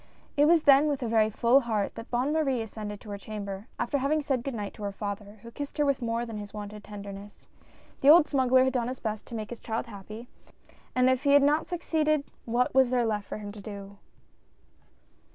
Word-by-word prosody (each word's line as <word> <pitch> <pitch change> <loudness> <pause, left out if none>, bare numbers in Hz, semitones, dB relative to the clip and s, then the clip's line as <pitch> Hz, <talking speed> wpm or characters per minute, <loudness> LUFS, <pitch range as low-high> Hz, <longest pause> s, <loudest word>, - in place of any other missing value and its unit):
It 290 - +5
was 325 0 +5
then 280 +1 +6
with 280 -3 -1
a - - -1
very 220 -1 +3
full 235 +5 +4
heart 220 -6 -1
that 230 - -9
Bonne 255 +5 0
Marie 270 -7 +1
ascended 210 -1 -7
to 210 - -9
her 200 - -5
chamber 200 0 -6
after 280 +4 -1
having 285 +4 +1
said 265 -4 -1
good 275 -2 -4
night 205 -2 -4
to - - -13
her 200 -1 -2
father, 205 +1 -6
who 235 - -10
kissed 285 +5 -7
her 295 - +3
with 280 -2 +1
more 230 0 -1
than 225 -2 -6
his 205 0 -9
wonted 210 0 -7
tenderness. 200 0 -10 0.5
The 275 - +4
old 315 0 +8
smuggler 260 -2 +4
had 260 0 +1
done 240 -2 0
his 255 +1 -5
best 215 -2 -4
to 235 - -7
make 215 0 -5
his 240 - -6
child 225 +1 -3
happy, 215 +2 -10 0.7
and 255 0 +4
if 260 0 +2
he 280 0 +3
had 285 -1 +7
not 295 +3 +2
succeeded 310 -4 0 0.2
what 240 +2 +1
was 265 -1 +5
there 245 -1 +2
left 210 -2 -2
for - - -5
him 205 -1 -7
to 210 0 -10
do 200 -1 -9
235 Hz, 225 wpm, -28 LUFS, 210-275 Hz, 0.7 s, old